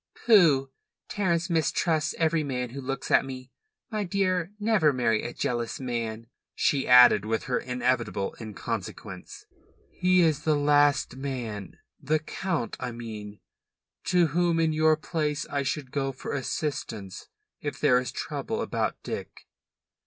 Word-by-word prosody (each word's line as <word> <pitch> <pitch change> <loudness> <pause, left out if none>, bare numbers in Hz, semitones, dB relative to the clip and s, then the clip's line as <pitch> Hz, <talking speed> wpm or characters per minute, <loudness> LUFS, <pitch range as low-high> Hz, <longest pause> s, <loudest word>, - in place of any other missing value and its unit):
"Pooh! 155 - +5 0.4
Terence 170 -4 0
mistrusts 160 -1 +1
every 165 -1 +2
man 125 -4 -3
who 140 +2 -6
looks 135 0 -4
at - - +5
me. 130 -1 -8 0.4
My 215 -1 -1
dear, 185 -2 0
never 210 -8 +3
marry 115 -5 +1
a 120 - -4
jealous 120 -1 -2
man," 115 -3 -3 0.3
she 140 -2 +1
added 125 -5 +8
with 110 +1 -1
her 125 - -1
inevitable 125 -5 -1
inconsequence. 110 -2 -6 0.5
"He 180 0 +3
is 155 -3 +2
the 155 0 +2
last 145 -2 +3
man 120 -7 -5 0.2
the 155 +3 +1
Count, 155 - -3
I 125 -1 -3
mean 110 -3 -8 0.6
to 180 -2 +4
whom, 170 -1 +2
in 160 -1 +2
your 155 0 +4
place, 155 -2 -2
I 140 - -1
should 135 -1 -3
go 135 -1 -1
for 130 - -6
assistance 125 - -4 0.3
if 145 - -5
there 125 -4 +4
is 125 - -4
trouble - - -3
about - - -1
Dick." - - -7
140 Hz, 140 wpm, -27 LUFS, 125-160 Hz, 0.6 s, added